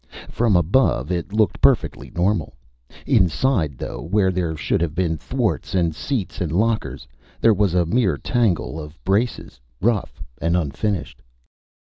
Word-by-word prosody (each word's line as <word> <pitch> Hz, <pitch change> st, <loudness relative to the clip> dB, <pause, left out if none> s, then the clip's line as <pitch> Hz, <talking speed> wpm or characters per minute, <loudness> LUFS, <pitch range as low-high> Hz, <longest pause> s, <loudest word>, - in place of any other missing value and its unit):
From 115 Hz, -4 st, +2 dB
above, 85 Hz, -, +2 dB
it 90 Hz, +1 st, -2 dB
looked 105 Hz, -3 st, +1 dB
perfectly -, -, +2 dB
normal. 90 Hz, -5 st, 0 dB, 0.5 s
Inside, 90 Hz, -, +2 dB
though, -, -, -6 dB
where 95 Hz, +3 st, +1 dB
there 85 Hz, -3 st, -2 dB
should -, -, 0 dB
have 80 Hz, -3 st, -1 dB
been 85 Hz, -2 st, 0 dB
thwarts 80 Hz, -, -2 dB
and 85 Hz, -3 st, +2 dB
seats 100 Hz, -, -3 dB
and 85 Hz, -4 st, -1 dB
lockers, 95 Hz, -, -1 dB, 0.3 s
there 115 Hz, -, +5 dB
was 100 Hz, -3 st, +1 dB
a 90 Hz, -1 st, +3 dB
mere 90 Hz, -, +1 dB
tangle 100 Hz, -, 0 dB
of 75 Hz, +1 st, -9 dB
braces, 100 Hz, -, -1 dB, 0.2 s
rough 110 Hz, -1 st, -1 dB, 0.2 s
and 85 Hz, +2 st, +2 dB
unfinished. 90 Hz, +1 st, -2 dB
90 Hz, 140 wpm, -22 LUFS, 80-105 Hz, 0.5 s, there